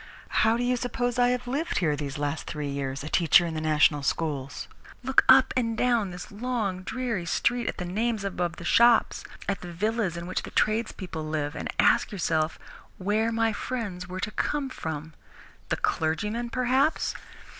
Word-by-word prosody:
How 225 +2 +3
do 245 - -1
you 250 0 +1
suppose 245 0 -2
I 245 0 +5
have 250 0 -1
lived 285 +7 -1
here 160 -4 +2
these 140 -1 -5
last 145 +1 -3
three 150 -2 -4
years, 140 -1 -3
a - - -5
teacher 170 +2 +5
in 165 - -3
the 155 - -3
national 150 -1 +3
schools? 140 -2 -2 0.4
Look 265 +1 +4
up 260 0 +7
and 230 -3 0
down 235 -5 +2
this 180 0 -8
long, 210 -4 -2
dreary 230 -4 -3
street, 240 +7 +1
at - - -2
the 180 - -4
names 215 +4 -1
above 175 -3 -2
the 170 - -9
shops, 235 +4 +4 0.2
at 200 - -1
the 175 - -7
villas 205 0 -1
in 170 - -5
which 185 - -2
the - - -8
tradespeople 205 -7 -1
live, 155 -1 -2
and - - -4
ask - - +4
yourself 160 -5 0 0.4
where 215 +4 +1
my 225 -1 +1
friends 205 -7 -4
were 185 0 -6
to 215 - -2
come 290 +2 -1
from? 160 -4 -5 0.6
The - - 0
clergyman, 210 +9 -1
perhaps? 260 +5 +1
195 Hz, 180 wpm, -27 LUFS, 160-240 Hz, 0.6 s, up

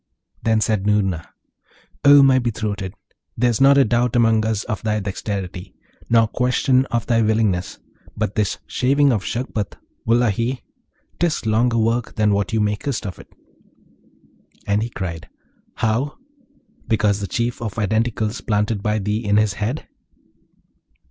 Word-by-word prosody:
Then 110 -1 +2
said 105 -2 0
Noorna, 95 -5 0 0.7
'O 145 0 +8
my 135 -1 +5
betrothed, 105 -5 -3 0.4
there's 120 0 +1
not 140 +1 +6
a 140 - +6
doubt 120 +1 +1
among 115 -2 +3
us 110 -2 -1
of 105 - -4
thy 110 -1 0
dexterity, 95 -2 -5 0.3
nor 115 -1 +4
question 125 +2 +1
of 120 -1 -2
thy 115 -2 +2
willingness; 110 -5 0 0.4
but 95 - -1
this 105 -3 0
shaving 140 +2 +2
of 105 -4 -1
Shagpat, 115 -4 -3 0.3
wullahy! 120 +2 +1 0.6
'tis 165 -8 0
longer 115 +2 +2
work 115 +1 0
than 105 -1 +2
what 100 0 0
thou 110 - -2
makest 105 +5 -1
of 90 -5 -6
it.' - - -15 1.3
And 100 +1 +1
he 115 - -2
cried, 85 -7 -6 0.5
'How? 120 +7 -1 0.7
because 105 -2 +2
of 100 - -4
the - - -11
Chief 120 0 -1
of 110 -5 -4
Identicals 110 +1 -1
planted 105 -1 0
by 105 +1 0
thee 105 +2 -2
in 105 -1 +2
his 105 -2 +2
head?' 110 +9 -3
110 Hz, 145 wpm, -21 LUFS, 105-120 Hz, 1.3 s, O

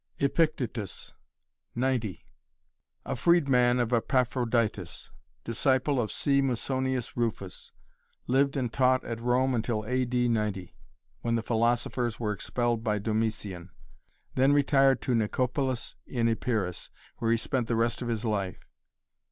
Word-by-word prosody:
Epictetus 140 - -1 0.7
Flor. 130 +3 +1
90 115 -7 -3 0.8
A 135 - -2
freedman 125 -5 +3
of 120 0 0
Epaphroditus, 115 -6 0 0.3
Disciple 130 +3 +1
of 110 - -3
C 140 -1 +2
Musonius 130 -1 -1
Rufus, 110 -5 -3 0.5
Lived 135 +2 +2
and 125 -4 -2
taught 130 -1 +3
at 115 -1 -5
Rome 125 +2 +2
until 110 -2 -1
A. 130 +2 +1
D. 125 0 +1
90 105 -6 -2 0.5
when 115 - 0
the 115 - -1
philosophers 120 +1 0
were 105 -3 -1
expelled 120 +2 -1
by 105 -2 +1
Domitian. 105 -4 -2 0.6
Then 135 +2 +4
retired 135 -2 +4
to 130 - 0
Nicopolis 125 +3 -1
in 120 -3 0
Epirus, 110 -5 -1 0.3
where 115 - -1
he 115 - +4
spent 120 +1 -1
the 115 - 0
rest 115 +2 0
of 120 - -3
his 115 -1 -2
life. 100 -4 -2
120 Hz, 130 wpm, -28 LUFS, 110-130 Hz, 0.8 s, Then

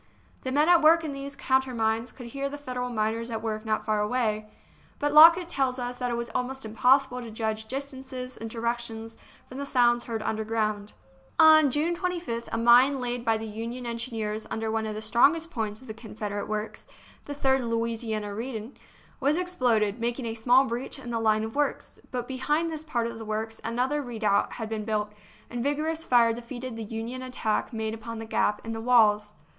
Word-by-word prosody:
The 260 - -3
men 295 +4 +3
at 345 -1 +6
work 325 +2 +6
in 305 -3 -3
these 275 0 -6
countermines 245 -4 0
could 250 - -11
hear 275 +4 -3
the 290 - -6
Federal 250 -3 -4
miners 225 0 -1
at 225 -1 -4
work 215 -1 -3
not 215 0 0
far 215 -1 +1
away, 215 -1 0 0.5
but 290 -1 -1
Lockett 335 +3 +9
tells 265 -6 0
us 245 0 -4
that 250 -1 -2
it 240 - -1
was 235 -1 -4
almost 260 0 -3
impossible 250 +3 +3
to 235 - -7
judge 220 0 -3
dis 275 +4 -4
tances 255 -1 -7
and 225 - -7
directions 230 -1 -3 0.3
from 260 - -8
the 280 - -3
sounds 240 -2 +3
heard 225 -2 -3
under 220 0 -1
ground. 215 -2 -2 0.4
On 310 -2 +8
June 310 +6 0
25th 340 -10 -3
a - - -1
mine 245 +4 +6
laid 245 -1 -2
by 225 -2 +2
the 220 - -6
Union 230 +3 -5
en 235 0 -3
gineers 220 -3 -4
under 220 0 -2
one 220 0 -1
of 215 - -4
the 215 - -5
strongest 295 +9 +3
points 215 -4 -3
of 260 - -14
the 220 - -5
Confederate 210 -2 -5
works 215 0 -4 0.4
(the 290 - -6
Third 265 -1 +2
Louisiana 230 -3 -2
Redan) 230 +2 -5 0.5
was 285 +3 +2
exploded, 245 - +1
making 240 +2 -2
a 225 - -2
small 245 +4 +4
breach 245 +4 -3
in 250 -3 -7
the 230 - -1
line 215 -1 +2
of 220 0 -5
works. 290 0 -2
But 245 -1 -4
behind 295 +5 0
this 310 -1 -5
part 240 -7 -1
of 230 -1 -5
the - - -6
works 220 +1 -4
another 255 +6 0
redoubt 220 -6 0
had 225 -2 -5
been 215 -1 -3
built, 210 -1 -1 0.4
and 240 0 -4
vigorous 310 +4 -1
fire 235 -5 +4
defeated 240 +1 -7
the 225 - -5
Union 225 +4 -5
attack 250 -4 -1
made 220 -1 -3
upon 225 +1 -7
the 225 - -6
gap 210 -1 0
in 225 - -4
the 225 0 -4
walls. 210 -3 +4
235 Hz, 205 wpm, -27 LUFS, 220-265 Hz, 0.5 s, Lockett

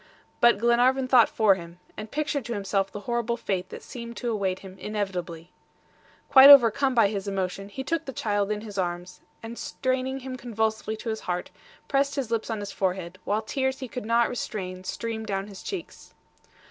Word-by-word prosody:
But 235 -3 +6
Glenarvan 245 +4 +3
thought 250 -3 +6
for 215 -3 +4
him, 170 -1 -9 0.2
and 215 - -7
pictured 290 -1 -2
to 235 0 -3
himself 195 -1 -1
the 205 - -7
horrible 235 +2 -1
fate 190 -5 -3
that - - -9
seemed 235 -1 -8
to 240 -2 -2
await 195 -4 -1
him 190 0 -11
inevitably. 180 -5 -4 0.8
Quite 270 +1 +9
overcome 270 0 +7
by 225 -4 +5
his 200 -1 -4
emotion, 195 0 -3
he 265 +6 -6
took 330 +3 -2
the 270 - -5
child 205 -4 -1
in 210 0 -2
his 205 -3 -6
arms, 175 0 -4 0.2
and 230 +1 -7
straining 260 0 -2
him 255 0 -6
convulsively 220 -2 -2
to 225 - -5
his 220 0 -2
heart, 180 0 -4 0.4
pressed 280 0 +1
his 265 -5 -3
lips 230 0 -1
on 220 -2 -2
his 205 - -5
forehead, 185 -1 -2
while 210 +2 0
tears 265 +3 -1
he 260 - -6
could 240 -2 -6
not 235 0 +3
restrain 185 -6 -5
streamed 220 +3 -4
down 195 -1 -2
his 200 -2 -11
cheeks. 385 -4 -8
220 Hz, 190 wpm, -26 LUFS, 195-250 Hz, 0.8 s, Quite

